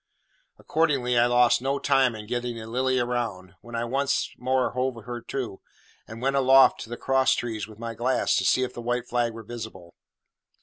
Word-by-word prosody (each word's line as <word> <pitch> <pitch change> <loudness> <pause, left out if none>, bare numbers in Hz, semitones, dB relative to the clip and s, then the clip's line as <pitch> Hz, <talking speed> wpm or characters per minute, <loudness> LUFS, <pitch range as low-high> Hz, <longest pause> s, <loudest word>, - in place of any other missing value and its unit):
Accordingly, 140 -6 0
I 120 0 +5
lost 120 0 +4
no 135 +2 0
time 135 -4 +2
in 105 -1 -8
getting 120 +1 -3
the 110 -1 -7
Lily 130 +3 0
round, 115 -7 -3
when 120 0 -9
I 115 0 -1
once 135 +3 0
more 130 0 0
hove 130 0 -1
her 120 0 -6
to, 120 -4 -5 0.5
and 115 +2 -9
went 135 +1 +1
aloft 135 0 +6
to - - -8
the 120 - -5
cross 135 0 +2
trees 110 -4 -4
with 110 -2 -14
my 115 0 -5
glass 125 +3 +1
to - - +1
see 130 - +3
if 130 - -4
the 120 - -7
white 120 +1 -2
flag 120 -1 0
were 115 0 -9
visible. 105 -7 -9
120 Hz, 200 wpm, -26 LUFS, 115-130 Hz, 0.5 s, aloft